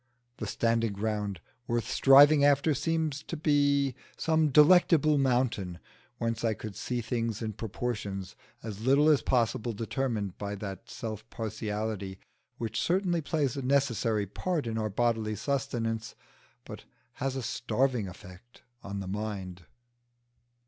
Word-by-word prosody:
The 110 - -4
standing 115 0 +1
ground 105 -3 -2 0.3
worth 120 0 -1
striving 140 +2 +7
after 145 +2 +4
seemed 160 +1 0
to 165 - -4
be 145 -3 +2 0.2
some 160 -1 +2
Delectable 155 0 +5
Mountain, 120 -9 0 0.4
whence 115 -1 -2
I 110 -2 +1
could 110 -2 -8
see 125 -1 -3
things 115 -2 -2
in 110 -1 -3
proportions 105 -3 -4 0.3
as 110 -2 -6
little 140 +4 +5
as 150 -3 +4
possible 120 -1 0
determined 110 -3 -3
by 100 0 -3
that 100 -1 -7
self 110 -1 -6
partiality 105 -3 -4 0.4
which 110 -2 -2
certainly 180 -1 +1
plays 145 -4 -1
a 140 - -3
necessary 125 -6 +1
part 160 - -2
in 110 -1 -2
our 110 -1 -1
bodily 110 0 0
sustenance, 115 -2 -2 0.5
but - - -9 0.4
has 135 0 -1
a 130 - -3
starving 125 -2 0
effect 90 +6 -13 0.2
on 100 0 -5
the 95 - -6
mind. 95 -4 -5
115 Hz, 135 wpm, -29 LUFS, 105-140 Hz, 0.5 s, striving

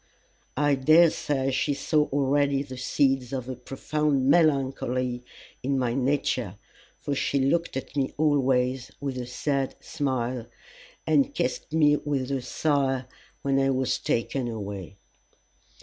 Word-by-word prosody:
I 145 0 +3
dare 155 +5 +5
say 135 -3 -1
she 140 +2 0
saw 150 +1 +1
already 140 0 +1
the 130 -2 -9
seeds 130 0 +1
of 130 -2 -4
a 130 - -4
profound 135 +2 -1
melancholy 130 -5 +1 0.4
in 135 +1 0
my 125 -2 0
nature, 130 -6 0 0.4
for 145 - -3
she 140 0 0
looked 140 +3 +1
at 135 +2 -7
me 135 -2 0
always 130 -4 +1
with 135 -3 -3
a 125 - -5
sad 135 +1 -1
smile, 130 -5 -2 0.6
and 150 -3 +2
kissed 125 - -2
me 150 -2 +4
with 140 -2 -2
a 135 -2 -1
sigh 135 0 0 0.4
when 135 -1 +2
I 135 0 +2
was 130 -1 0
taken 120 +2 -1
away. 100 -3 -6
135 Hz, 135 wpm, -26 LUFS, 125-145 Hz, 0.6 s, dare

